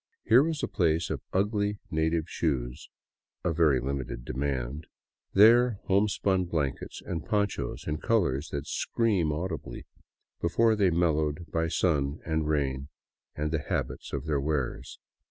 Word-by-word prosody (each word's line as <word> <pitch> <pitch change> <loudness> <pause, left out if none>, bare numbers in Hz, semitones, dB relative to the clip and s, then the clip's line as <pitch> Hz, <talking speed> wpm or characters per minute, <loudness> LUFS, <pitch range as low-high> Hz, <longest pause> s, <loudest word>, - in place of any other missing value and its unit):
Here - - +6
was 155 0 -1
a - - +1
pile 85 -6 +2
of - - -3
ugly 105 +1 0
native 80 +1 +1
shoes 65 -9 -2 0.3
— - - -61
of 85 - +1
very 75 -6 +4
limited 65 -2 -4
demand 70 +2 -3 0.2
— - - -54
there, 120 +4 +7
homespun 95 -1 +2
blankets 75 -6 -3
and 80 -3 -3
ponchos 100 -1 -1
in 75 0 -1
colors 80 - +1
that 70 0 -4
scream 100 -3 0
audibly, 80 +2 -4 0.6
be 85 - +1
fore 115 +4 +3
they 100 -3 +3
mellowed 80 -2 +1
by 80 0 +1
sun 75 -4 +1
and 80 -1 0
rain 70 -3 0 0.5
and 75 0 -2
the 80 -2 0
habits - - -3
of 70 0 -3
their 75 -3 0
wearers. 70 -3 -2
80 Hz, 150 wpm, -28 LUFS, 70-95 Hz, 0.6 s, there